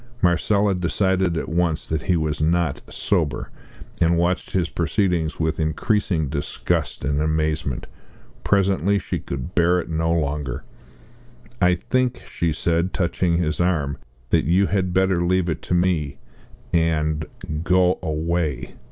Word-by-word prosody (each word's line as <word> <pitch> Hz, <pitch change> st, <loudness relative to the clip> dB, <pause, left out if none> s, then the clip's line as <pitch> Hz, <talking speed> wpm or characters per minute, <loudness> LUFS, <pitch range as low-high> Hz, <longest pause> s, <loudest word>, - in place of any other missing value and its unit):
Marcella 100 Hz, +3 st, +3 dB
decided 95 Hz, -1 st, +1 dB
at -, -, -3 dB
once 85 Hz, -1 st, 0 dB
that 80 Hz, -1 st, -2 dB
he 90 Hz, -, +1 dB
was 75 Hz, -2 st, -1 dB
not 85 Hz, -2 st, +1 dB
sober, 80 Hz, -9 st, -1 dB, 0.5 s
and 85 Hz, 0 st, +4 dB
watched 85 Hz, +2 st, 0 dB
his 90 Hz, -2 st, 0 dB
proceedings 85 Hz, -2 st, 0 dB
with 80 Hz, 0 st, 0 dB
increasing 80 Hz, +1 st, 0 dB
disgust 70 Hz, -2 st, -2 dB
and 70 Hz, +1 st, 0 dB
amazement. 75 Hz, -3 st, -1 dB, 0.6 s
Presently 100 Hz, 0 st, +2 dB
she -, -, -3 dB
could 70 Hz, +6 st, -6 dB
bear 90 Hz, 0 st, +3 dB
it 85 Hz, -, -5 dB
no 80 Hz, +1 st, 0 dB
longer. 75 Hz, -5 st, -1 dB, 1.0 s
"I 90 Hz, -1 st, +5 dB
think," 125 Hz, +7 st, -1 dB
she 85 Hz, -1 st, -1 dB
said, 85 Hz, +3 st, 0 dB
touching 85 Hz, -1 st, +1 dB
his 80 Hz, -3 st, -1 dB
arm, 75 Hz, -6 st, 0 dB, 0.3 s
"that -, -, +3 dB
you 90 Hz, +6 st, +3 dB
had 95 Hz, -2 st, 0 dB
better 95 Hz, -1 st, +2 dB
leave 90 Hz, 0 st, +1 dB
it -, -, -4 dB
to 90 Hz, -, +2 dB
me 85 Hz, -6 st, +1 dB, 0.6 s
and 80 Hz, -2 st, +1 dB, 0.4 s
go 90 Hz, +1 st, +3 dB
away!" 80 Hz, -4 st, -2 dB
85 Hz, 135 wpm, -22 LUFS, 80-90 Hz, 1.0 s, I